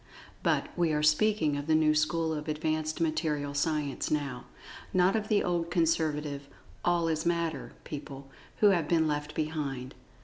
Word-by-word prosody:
But, - - +1
we 170 -2 +2
are 150 0 0
speaking 155 0 +3
of 145 +1 -5
the 160 - +4
new 155 -1 +4
school 160 +1 +1
of 150 0 -5
advanced 155 0 -1
Material 155 -3 -1
Science 145 -1 -1
now—not 150 - -2
of 215 -1 -1
the 210 -1 +2
old 170 -1 -1
conservative 155 -4 0 0.4
"All 175 -1 +2
is 160 -1 0
Matter" 170 -2 -1
people, 140 -2 -8 0.3
who 210 - +7
have 170 -5 +1
been 160 -2 +3
left 150 0 -3
behind. 145 -5 -3
155 Hz, 150 wpm, -29 LUFS, 150-165 Hz, 0.4 s, who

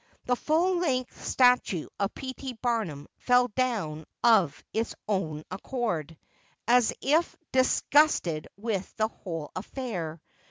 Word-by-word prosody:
The 250 - +2
full 345 +7 +2
length 255 -7 -1
statue 250 - +3
of 200 0 -1
P. 260 -1 -5
T. 260 -1 -6
Barnum 225 - -2
fell 250 0 +3
down 205 -11 -1 0.2
of 195 -11 +4
its 225 +1 -1
own 160 -7 -1
accord, 185 - -3 0.5
as 245 -1 +5
if 310 +5 +2 0.2
disgusted 260 - +3
with 200 -3 -3
the 220 0 +2
whole 165 -8 -6
affair. 185 - -4
225 Hz, 120 wpm, -28 LUFS, 170-255 Hz, 0.5 s, as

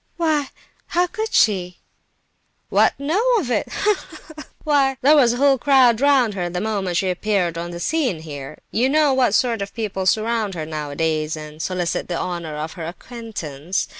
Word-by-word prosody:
"Why, 310 -4 +1 0.4
how 355 +1 +2
could 435 +5 -4
she—" 180 -5 +2 0.9
"What, - - +3
know 310 +9 0 0.2
of 285 - -2
it? 220 - 0
Ha, 420 +1 +1
ha, - - -11 0.2
ha! 305 - -8 0.2
Why, 275 -3 +2
there 295 +3 +6
was 245 -5 +5
a - - -3
whole 275 0 +4
crowd 255 -4 +4
round 270 -6 +4
her 180 -3 -3
the 180 +1 -3
moment 195 -4 -1
she 185 0 +1
appeared 180 -2 0
on 170 +1 -4
the 170 0 -7
scenes 245 - -1
here. 145 -2 -8
You 250 +4 +2
know 300 -1 +3
what 250 -5 +3
sort 235 -5 +1
of 200 - -6
people 195 -4 -3
surround 220 -1 +1
her 160 -2 -4
nowadays, 155 +1 -2
and 155 0 -9
solicit 180 -1 -2
the 175 - -2
honour 170 -4 -4
of 155 +2 -5
her 165 -2 -6
'acquaintance. 180 - -5
210 Hz, 185 wpm, -21 LUFS, 170-270 Hz, 0.9 s, there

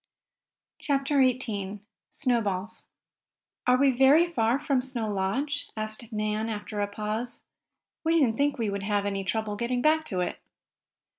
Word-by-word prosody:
CHAPTER 275 0 +1
XVIII 215 -6 0 0.3
SNOWBALLS 225 -9 -1 0.8
"Are 250 0 +5
we 275 +1 +4
very 270 +6 +6
far 240 -8 +1
from 275 -3 +1
Snow 250 -4 -2
Lodge?" 235 +9 -1
asked 215 +1 -3
Nan, 215 +1 -1
after 210 -1 -4
a 205 - +1
pause. 215 +4 -2 0.6
"We 330 +1 +3
didn't 240 -7 +3
think 285 0 +1
we 225 -4 -1
would 200 0 -3
have 205 0 0
any 195 -1 -1
trouble 215 +1 -1
getting 245 +3 -1
back 315 +1 +4
to 185 -10 -2
it." 180 - -3
230 Hz, 145 wpm, -27 LUFS, 210-270 Hz, 0.8 s, very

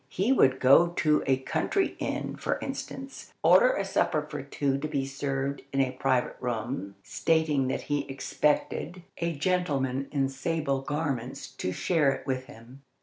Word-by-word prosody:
He 205 +8 +2
would 130 - +4
go 140 +7 +7
to 155 -3 +2
a 135 -1 +4
country 380 - -1
inn, - - -3
for - - -1
instance, 270 0 -6
order - - +6
a - - -1
supper - - +1
for - - -5
two 140 -1 -1
to 155 - -2
be 140 -3 -1
served 135 0 -2
in 135 - -1
a 130 -1 +2
private 130 -1 0
room, 115 -4 -3
stating 155 -3 +1
that 130 - -1
he 145 -1 -2
expected 150 +5 -1 0.2
a 170 -1 -1
gentleman 140 -5 0
in 140 -2 +1
sable 140 0 -1
garments 140 -3 -3
to 90 - -3
share 150 - +2
it - - -8
with 130 -1 -2
him. 120 +3 -14
140 Hz, 160 wpm, -28 LUFS, 130-160 Hz, 0.2 s, go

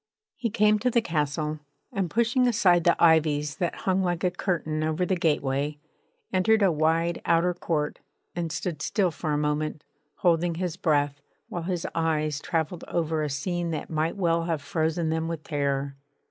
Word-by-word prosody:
He 235 - -2
came 210 0 +3
to 250 - +1
the 235 - +3
castle, 155 -5 -1 0.3
and 190 -3 -1
pushing 235 - +2
aside 180 -7 +3
the 170 - +5
ivies 150 -3 +3
that 175 -3 -1
hung 190 0 +2
like 175 -2 -1
a 180 - +2
curtain 160 -4 -2
over 160 +3 0
the 190 - +1
gateway, 145 -3 0 0.6
entered 215 +3 +3
a 190 - +5
wide 165 +2 +1
outer 170 +2 +3
court 155 -4 -2 0.4
and 170 -2 -2
stood 165 -2 -3
still 190 -1 +1
for 155 -1 -3
a 145 - +1
moment, 150 0 -1 0.3
holding 170 -1 +2
his 175 -1 -2
breath, 145 -4 +1 0.3
while 175 - -4
his 180 -2 -2
eyes 155 -3 0
travelled 165 +2 -2
over 160 -2 -1
a 150 - -1
scene 170 +5 -2
that 160 -1 -4
might 160 +3 -1
well 170 -3 +1
have 165 -4 -2
frozen 160 +1 0
them 160 0 -1
with 165 -2 -4
terror. 140 -2 -1
165 Hz, 175 wpm, -26 LUFS, 155-180 Hz, 0.6 s, the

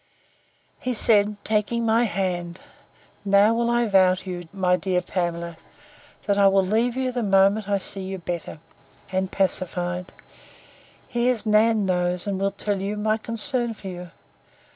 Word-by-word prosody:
He 250 -1 -3
said, 210 -1 +4
taking 220 +2 0
my 225 +2 +3
hand, 180 -4 -3 0.6
Now 200 +2 +4
will 235 +1 0
I 240 0 +2
vow 190 -3 +4
to 185 +1 -9
you, 175 -1 -7
my 185 -2 +1
dear 180 0 -1
Pamela, 170 -2 -3 0.7
that 200 -1 +1
I 200 - +6
will 195 -1 +3
leave 230 +5 0
you 260 -1 -1
the 245 -1 -3
moment 200 0 +2
I 200 - +2
see 195 0 -6
you 190 0 -5
better, 175 -2 -6 0.5
and 190 0 -1
pacified. 180 -2 -2 1.0
Here's 240 -1 0
Nan 215 0 +3
knows, 180 -1 -1
and 200 -2 -2
will 195 0 +1
tell 200 0 -3
you, 205 +2 -3
my 215 +1 0
concern 230 +1 +1
for 195 - -8
you. 180 -1 -8
200 Hz, 155 wpm, -23 LUFS, 185-220 Hz, 1.0 s, I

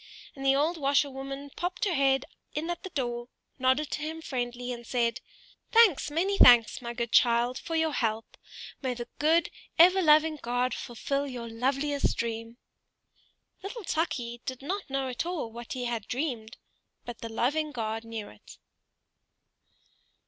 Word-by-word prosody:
And 270 - -8
the 270 0 +4
old 315 +5 +1
washerwoman 275 0 -1
popped 360 +4 -2
her 385 - +1
head 270 -2 +2 0.3
in 320 +3 -2
at 345 - -5
the 380 - -7
door, 240 -5 -3 0.3
nodded 260 +3 +2
to - - -2
him 320 +1 -4
friendly, 245 -4 -4
and 240 0 -8
said, 235 -1 0 0.5
"Thanks, 445 - +5
many 375 +7 0
thanks, 240 0 +7
my 235 -1 -4
good 235 -1 -3
child, 240 +1 +4
for 330 - -4
your 320 -1 +2
help! 225 -3 -2 0.5
May 260 -3 -1
the 240 0 -6
good 320 +3 +3 0.3
ever 365 +3 +7
loving 310 -1 +5
God 245 +1 0
fulfil 275 +4 -3
your 245 -3 -6
loveliest 275 +5 0
dream!" 230 0 -4 1.0
Little 415 +4 -6
Tukey 245 -9 -2
did 260 0 -5
not 375 +3 -4
at 265 -2 -2
all 355 0 -2
know - - -2
what 235 0 -7
he 250 -2 -3
had 235 -3 -3
dreamed, 245 -4 -3 0.5
but 240 -1 -7
the 230 - -6
loving 295 +7 0
God 225 -3 -3
knew 225 -2 -6
it. 105 - -15
265 Hz, 155 wpm, -28 LUFS, 240-310 Hz, 1.0 s, thanks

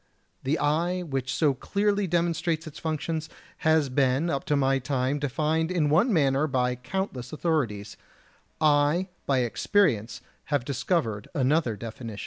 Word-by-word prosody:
The 140 +5 0
eye, 170 +5 0
which 135 -5 -3
so 150 -1 +2
clearly 200 +7 0
demonstrates 170 -1 0
its 155 -1 -9
functions, 160 0 -3 0.3
has 160 -2 +3
been 135 +4 +1
up 140 - -2
to 150 - +1
my 135 -1 +2
time 130 +2 -1
defined 155 +4 0
in 160 -5 +1
one 190 - +4
manner 140 -4 +2
by 125 -3 0
countless 130 -2 -4
authorities; 140 -11 -2 0.6
I 155 +4 +3 0.2
by 135 -2 +3
experience 120 - +1 0.2
have 145 -4 -1
discovered 125 - -1
another 135 -3 +2
definition. 115 0 -7
145 Hz, 135 wpm, -26 LUFS, 130-165 Hz, 0.6 s, one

